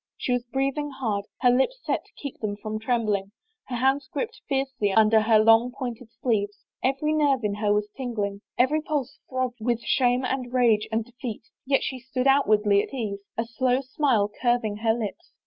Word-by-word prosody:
She - - -2
was 245 -1 0
breathing 275 +3 -1
hard, 225 -7 -2 0.2
her 250 -1 +5
lips 265 - +2
set - - -1
to - - -25
keep 280 -3 -8
them 205 -2 -3
from 215 +1 -4
trembling, 215 -4 0 0.3
her 250 - -4
hands 265 +3 +1
gripped 465 -1 -4
fiercely 270 -6 0
under 220 +1 +5
her 220 0 +4
long 225 +3 +5
pointed 245 -3 -6
sleeves. 205 -4 -1 0.2
Every 275 +4 +1
nerve 285 -5 +2
in 210 -1 0
her 205 0 0
was 210 0 +1
tingling, 210 -6 -3 0.2
every 260 +5 +3
pulse 285 -4 -3
throbbed 255 -2 -2
with 235 0 0
shame 250 0 +2
and 255 -1 -2
rage 230 -4 +3
and 220 0 0
defeat, 245 -2 -7 0.2
yet 275 0 +3
she 260 - -3
stood 255 +1 -3
outwardly 215 -7 +4
at - - -7
ease, 210 -5 -3 0.2
a 230 - 0
slow 250 +2 +1
smile 260 -6 +1
curving 240 -4 +1
her 225 0 +2
lips. 220 -4 -6
245 Hz, 185 wpm, -25 LUFS, 215-265 Hz, 0.3 s, her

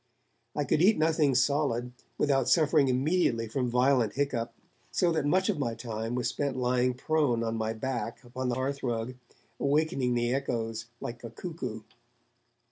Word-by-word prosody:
I - - +1
could 155 - +1
eat 205 +5 +5
nothing 155 -3 +3
solid, 130 -2 +1 0.3
without 135 -3 +2
suffering 155 -3 +4
immediately 130 -3 +1
from 125 +2 -1
violent 125 -2 +3
hiccough, 130 -5 -1 0.4
so 175 -2 +2
that 155 -3 0
much 185 +5 +3
of 195 -8 0
my 120 -5 -1
time 115 0 -4
was 125 - 0
spent 140 -3 -2
lying 125 0 +1
prone 135 -4 +1
on 115 0 -1
my 110 0 -1
back 115 0 -4
upon 125 +1 -4
the 120 - 0
hearthrug, 130 -3 -2 0.5
awakening 140 -3 +1
the 120 +1 +1
echoes 115 -4 -2
like 120 +1 -6
a 115 - -5
cuckoo. 125 - -6
130 Hz, 155 wpm, -29 LUFS, 120-145 Hz, 0.5 s, eat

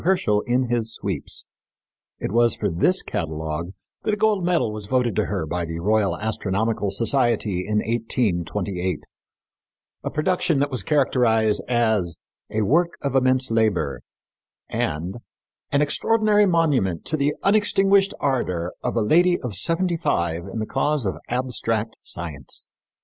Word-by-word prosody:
Herschel 155 - +2
in 125 +2 +2
His 115 -2 -1
Sweeps_. 95 -8 -3 0.7
It - - -3
was 120 +1 +3
for 105 -3 -1
this 180 - +2
catalogue 80 +1 -3 0.3
that 210 - 0
a - - -12
gold 210 -3 +2
medal 170 -10 +1
was 105 -1 -6
voted 125 -3 +1
to - - +2
her 80 - -2
by 85 +3 -2
the 85 0 -4
Royal 100 -1 +1
Astronomical 110 0 -1
Society 110 -4 +1
in 105 0 0
1828 100 -6 -1 1.0
a - - -2
production 170 +1 +1
that 140 +1 0
was 125 -5 -1
characterized 115 -4 +2
as 110 -8 +1 0.3
"a 110 0 0
work 170 - +2
of 140 -2 -1
immense 130 -1 +3
labor" 110 -10 +1 0.7
and 85 +8 -2 0.5
"an 145 +1 +3
extraordinary 210 +6 +3
monument 145 - +1
to 160 - -1
the 145 0 +1
unextinguished 200 -1 +3
ardor 90 -11 -1
of - - -2
a 115 - +2
lady 175 +9 +4
of 125 -5 -4
seventy 170 - +1
five 85 - -1
in 115 - -5
the 110 - -1
cause 145 +2 0
of 95 - -1
abstract 115 -3 -1
science." 75 -6 -4
115 Hz, 145 wpm, -23 LUFS, 95-150 Hz, 1.0 s, lady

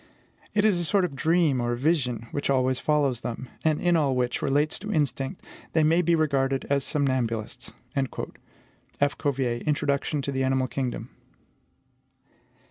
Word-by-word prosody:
It 210 0 +3
is 200 -5 +4
a - - -1
sort 190 +3 +2
of 140 - -5
dream, 155 -3 +2
or 120 0 0
vision, 125 -5 0
which 145 - -2
always 130 -1 +2
follows 145 -5 +1
them 125 +2 -5
and 155 -1 +2
in 175 -1 +3
all 145 -5 +2
which 125 -1 0
relates 145 +3 +1
to 210 +2 -5
instinct 145 -1 -1 0.3
they 160 - +4
may 165 +3 +4
be 170 0 +3
regarded 135 -4 +1
as 140 -1 +2
somnambulists." 130 -7 -1 0.2
F. 140 +1 -4
Cuvier: 125 -4 0
Introduction 145 -1 0
to 140 - -2
the 135 -1 0
Animal 130 0 +2
Kingdom. 130 -1 -4
140 Hz, 150 wpm, -26 LUFS, 130-155 Hz, 0.3 s, is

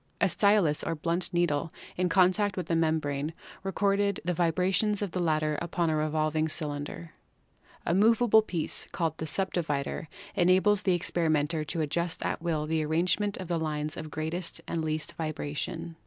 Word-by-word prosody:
A 200 - +4
stylus 200 -7 +3
or - - -1
blunt 170 +4 -1
needle 165 -3 +1 0.2
in 180 0 +1
con 185 +1 +5
tact 205 0 -1
with 180 - -2
the 165 - 0
membrane 155 -2 0 0.3
recorded 200 +1 +1
the 180 - +1
vibrations 185 +5 +1
of 200 - -3
the 180 - -2
latter 155 -3 +1
upon 170 -1 0
a - - +1
revolving 155 +1 0
cylinder. 150 +1 -4 0.7
A - - +1
movable 220 +3 +5
piece, 175 -7 -3
called 165 -2 -1
the 160 - -2
subdivider, 160 -5 -1 0.3
enables 190 +3 +4
the 185 -3 +2
experimenter 160 -3 0
to 165 +1 -2
adjust 170 +3 -1
at - - -2
will 160 -3 -1
the 160 0 0
arrangement 180 +6 +1
of 185 - -6
the 170 -1 0
lines 155 -1 -2
of 155 -1 -6
greatest 160 +3 -4
and 165 -1 -2
least 155 +1 -2
vibra 155 -2 -2
124 - - -4
PHYSICS 145 0 -3
tion. 170 -1 -5
165 Hz, 175 wpm, -29 LUFS, 155-185 Hz, 0.7 s, con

